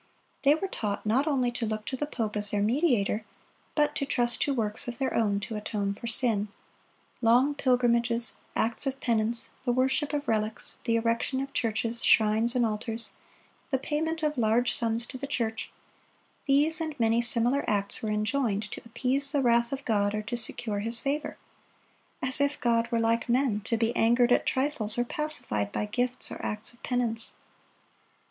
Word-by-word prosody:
They 285 +1 +5
were 385 +5 -3
taught 210 - -3
not 255 +8 +2
only 255 -5 +1
to 240 -1 -2
look 215 0 -4
to 265 - -3
the 295 +3 -3
pope 225 -7 -3
as 205 -1 +4
their 205 0 +1
mediator, 230 - +1 0.5
but 295 -1 +2
to - - -1
trust 240 -3 +2
to 285 - +2
works 225 -4 -2
of 240 - -5
their 265 -2 -1
own 205 -3 +1
to 220 - -5
atone 210 -1 -2
for 235 - -8
sin. 225 -3 +2 0.7
Long 245 +5 +4
pilgrimages, 240 -3 +2 0.2
acts 230 +5 -1
of 270 0 -3
penance, 230 -1 0
the 250 - 0
worship 265 +4 +1
of 290 -1 -3
relics, 215 0 -2
the 230 -2 +2
erection 230 +3 0
of 275 +1 -5
churches, 230 +1 -1
shrines, 220 +3 +3
and 245 -1 +3
altars, 225 +1 -2 0.6
the 265 - +1
payment 320 +4 -2
of 300 -3 0
large 230 +2 +3
sums 230 0 +2
to 260 - -8
the 280 - -4
church,—these 280 +5 -2
and 310 -3 -4
many 230 0 +3
similar 240 +3 +2
acts 200 -1 +1
were 220 - -3
enjoined 215 -1 -1
to - - -7
appease 265 +4 0
the 285 -2 +1
wrath 235 -1 +3
of 275 0 -5
God 205 -2 +1
or 215 - -3
to 225 +3 -4
secure 220 -2 -1
His 230 +3 +3
favor; 290 +2 -2 0.9
as 260 +2 +3
if 285 +1 0
God 235 -1 +1
were 230 - +1
like 230 +2 0
men, 240 -4 +1
to 230 - 0
be 230 +1 0
angered 240 +2 +3
at - - +3
trifles, 260 -6 +1
or 240 - +1
pacified 240 - -1
by - - -2
gifts 245 +4 -1
or - - -7
acts 210 +3 -4
of 240 - -21
penance! 235 -3 -2
235 Hz, 180 wpm, -28 LUFS, 220-265 Hz, 0.9 s, They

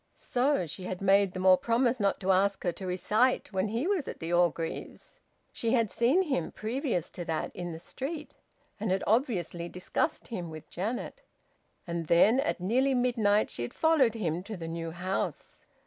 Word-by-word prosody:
So 255 -5 +1
she 175 +4 -7
had 185 0 -4
made 195 0 +4
them 185 0 -3
all 185 -1 +8
promise 240 +3 +1
not 200 -2 +1
to 190 0 +2
ask 195 +1 +2
her 175 - +1
to 185 +2 -7
recite 215 +6 +1
while 190 +2 +1
he 230 +7 -1
was 375 -6 0
at - - -6
the 165 +1 -3
Orgreaves'! 170 -2 -1 0.3
She 230 0 -1
had 230 -5 +2
seen 265 +11 +3
him, 265 - -1
previous 225 - -2
to 175 - -6
that, 160 -1 -3
in 175 -1 -4
the 160 - -6
street, 290 - -6 0.5
and 215 0 -2
had 190 +1 +1
obviously 185 - 0
discussed 185 - -2
him 180 -8 -4
with 155 -1 -10
Janet... 215 +8 -4 0.6
And 170 -2 -3
then, 205 +10 +5
at 285 -6 0
nearly 255 +9 +2
midnight, 230 -4 +2
she - - -5
had 120 - -5
followed 295 -8 +3
him 175 -6 -1
to 210 +2 -7
the 165 -1 -6
new 165 0 -4
house! 180 +3 -4
200 Hz, 185 wpm, -29 LUFS, 175-245 Hz, 0.6 s, all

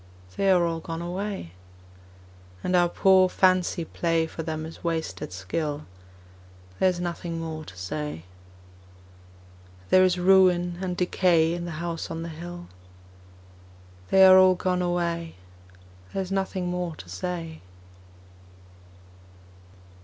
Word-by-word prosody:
They 195 - +1
are 180 -2 +4
all 165 -1 -2
gone 165 +1 -6
away. 190 - -4 1.1
And 180 - 0
our 175 -1 +4
poor 185 0 +4
fancy 185 -2 +2
play 165 0 0
For 160 - -7
them 155 -1 -4
is 160 - -11
wasted 160 - -3
skill: 145 - -4 0.9
There 190 - +4
is 180 -1 -3
nothing 170 -1 -4
more 160 -1 -5
to 90 - -12
say. 90 - -5 1.7
There 185 - +7
is 185 -1 +3
ruin 180 -1 +4
and 180 -2 -3
decay 175 -2 +2
In 175 0 -4
the 170 -3 -6
House 165 -1 -4
on 165 0 -5
the 170 - -6
Hill 175 +2 -8 1.4
They 190 0 +7
are 185 0 +9
all 185 0 +6
gone 180 0 -1
away, 170 -1 -2 0.8
There 195 - -2
is 185 - -9
nothing 190 -1 -2
more 180 -2 -3
to 90 - -12
say. 165 - -5
175 Hz, 130 wpm, -26 LUFS, 165-185 Hz, 1.7 s, are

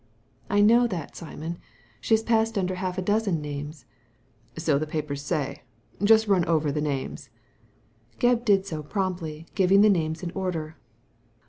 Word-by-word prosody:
'' - - -38
I 205 +1 +3
know 235 +3 +5
that, 175 -9 -5
Simon. 165 0 -7 0.4
She 220 - +3
has 220 - -1
passed 225 -1 +1
under 185 -1 0
half 185 0 -3
a 185 - -1
dozen 205 -3 +1
names.'' 145 0 -6 0.4
" - - -38 0.3
So 155 -3 +1
the 155 - -3
papers 150 -2 -3
say. 145 -1 -3 0.4
Just 220 +1 +5
run 190 -4 +3
over 155 -3 +1
the 150 +1 -2
names." 140 -3 -3 0.9
Gebb 245 -1 +2
did 200 -4 +3
so 160 -5 -4
promptly, 165 -2 -3
giving 195 0 +4
the 210 0 +6
names 160 -1 -1
in 170 - -3
order. 170 -5 -3
180 Hz, 165 wpm, -26 LUFS, 155-205 Hz, 0.9 s, the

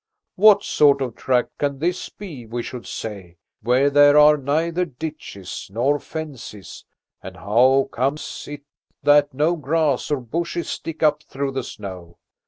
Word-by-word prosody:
What 205 +1 +6
sort 140 -2 +4
of 125 -3 -2
tract 125 -2 -1
can 140 -1 -1
this 175 +5 -2
be, 150 - -10
we 120 +1 -4
should 125 0 -8
say, 95 -6 -7 0.2
where 125 +5 +2
there 145 +1 +6
are 150 0 +7
neither 160 +5 -1
ditches 150 - -7
nor 135 +7 +1
fences, 140 -12 -8 0.4
and - - -10
how 130 +6 +3
comes 135 +5 -3
it 145 -1 -8 0.4
that 145 0 +5
no 155 +5 +2
grass 150 -3 0
or 145 -2 0
bushes 170 +7 -4
stick 165 -1 -5
up 150 -1 +3
through 140 -2 -4
the 135 0 -3
snow? 90 -6 -9
140 Hz, 150 wpm, -22 LUFS, 125-155 Hz, 0.4 s, are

